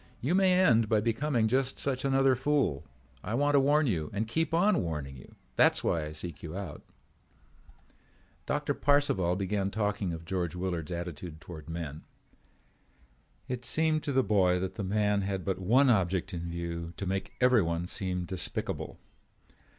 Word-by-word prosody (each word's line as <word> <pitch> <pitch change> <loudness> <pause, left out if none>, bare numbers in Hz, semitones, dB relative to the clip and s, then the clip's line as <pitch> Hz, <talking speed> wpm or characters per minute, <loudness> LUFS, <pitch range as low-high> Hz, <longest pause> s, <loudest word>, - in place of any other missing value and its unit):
You 140 +8 0
may 190 -1 +4
end 115 - +4
by 110 - +4
becoming 115 +2 +1
just 130 +3 +1
such 130 -2 -2
another 135 -1 +3
fool. 130 - 0 0.4
I 110 - -2
want 145 +3 +2
to 140 - +6
warn 145 +3 +3
you 80 - -1
and 105 +2 -2
keep 160 +8 0
on 180 +2 +3
warning 75 -5 -4
you. 65 - -14 0.2
That's - - +4
why 80 -2 0
I 75 - -6
seek 80 +2 -7
you 80 +2 -6
out." 95 -7 -6 1.7
Doctor - - 0
Parcival 140 -12 +2
began 95 +1 -1
talking 105 -2 -1
of 85 0 -7
George 90 -2 -2
Willard's 90 -3 -3
attitude 85 -2 -6
toward 80 -2 -10
men. 80 -3 -5 1.5
It 125 -1 -4
seemed 155 +3 +1
to 145 - -1
the 130 -1 +3
boy 95 -4 +3
that 95 0 -3
the 105 - -5
man 105 +1 +1
had 95 -1 -3
but 95 -2 -1
one 120 +9 +4
object 95 -2 +1
in 85 0 -4
view, 85 0 -5
to 100 - -4
make 95 +1 -3
everyone 95 -10 +3
seem 90 -1 -3
despicable. 95 0 -4
100 Hz, 165 wpm, -30 LUFS, 85-130 Hz, 1.7 s, to